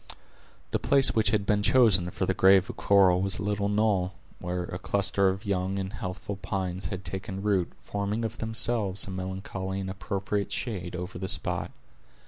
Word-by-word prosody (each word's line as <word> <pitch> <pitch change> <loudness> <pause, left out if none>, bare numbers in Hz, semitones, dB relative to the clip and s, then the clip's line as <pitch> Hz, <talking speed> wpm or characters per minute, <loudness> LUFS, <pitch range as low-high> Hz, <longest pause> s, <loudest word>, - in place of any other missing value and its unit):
The - - +1
place 135 -4 +5
which 110 -2 +2
had 105 -2 +1
been 105 0 +2
chosen 105 -6 +4
for - - -2
the - - +1
grave 95 0 +5
of - - -16
Cora 95 -3 +4
was 95 -1 +1
a - - -4
little 100 0 0
knoll, 100 -3 +1 0.3
where 90 0 -3
a 90 0 -6
cluster 100 -1 +2
of 95 +1 -4
young 95 -1 -1
and 95 +1 -4
healthful 100 -1 -5
pines 95 -1 -3
had 95 -1 -6
taken 95 0 -5
root, 100 -4 +1
forming 100 +3 -2
of 110 +1 -5
themselves 110 -3 +1
a 100 - -7
melancholy 95 +1 -4
and 95 -1 -4
appropriate 100 +1 -3
shade 90 -7 -3
over 90 +1 -6
the 95 - -4
spot. 90 -3 -3
95 Hz, 180 wpm, -28 LUFS, 95-105 Hz, 0.3 s, place